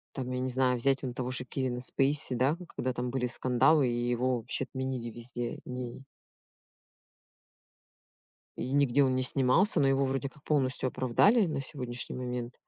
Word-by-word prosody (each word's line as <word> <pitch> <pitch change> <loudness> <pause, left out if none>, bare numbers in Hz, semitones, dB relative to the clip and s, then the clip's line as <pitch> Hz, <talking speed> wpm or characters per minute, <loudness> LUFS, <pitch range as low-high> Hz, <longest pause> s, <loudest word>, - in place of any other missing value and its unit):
Там, 130 -2 -4
я 125 - -2
не 130 - -1
знаю, 125 0 +2
взять 135 +3 +2
он 125 -2 -4
того 125 0 -3
же 130 0 0
Кевина 130 -1 -3
Спейси, 135 +1 +1
да, 130 +6 +2 0.2
когда 130 - -1
там 125 0 -3
были 125 -1 -1
скандалы, 130 +3 +3
и 120 0 -1
его 125 +1 +1
вообще 115 - -2
отменили 130 -3 -4
везде, 120 +1 -5
не 125 0 -6 2.6
И 130 - -4
нигде 140 -1 +3
он 130 -1 +1
не 130 - +1
снимался. 140 - +3
Но 135 - +4
его, 135 0 +2
вроде 135 +1 -1
как, 140 +1 -20
полностью 130 -3 0
оправдали 195 - +3
на 155 -4 -2
сегодняшний 125 -3 -3
момент. 125 -1 -4
130 Hz, 165 wpm, -30 LUFS, 125-135 Hz, 2.6 s, Но